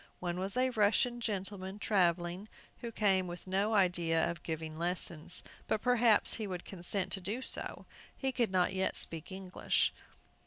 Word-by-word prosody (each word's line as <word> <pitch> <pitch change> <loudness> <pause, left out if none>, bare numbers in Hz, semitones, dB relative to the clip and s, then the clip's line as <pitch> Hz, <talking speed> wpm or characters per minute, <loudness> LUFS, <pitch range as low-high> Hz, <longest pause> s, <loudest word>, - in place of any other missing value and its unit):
One 175 0 -3
was 195 +4 -1
a 255 0 +3
Russian 225 +2 +2
gentleman, 195 -2 -3
travelling, 180 -1 +1 0.3
who 235 - -5
came 195 -4 +2
with 175 0 -7
no 200 +4 +1
idea 175 -4 +3
of 170 -1 -9
giving 160 -1 -5
lessons, 170 -2 0 0.2
but - - +1
perhaps 235 -2 +4
he 215 -2 -3
would 180 -2 -5
consent 185 +1 +1
to 195 - -1
do 215 +8 -3
so. - - -4 0.3
He 265 -1 -1
could 240 -3 +1
not 185 0 +2
yet 190 0 0
speak 165 +2 -3
English. 190 -1 0
190 Hz, 160 wpm, -33 LUFS, 175-215 Hz, 0.3 s, perhaps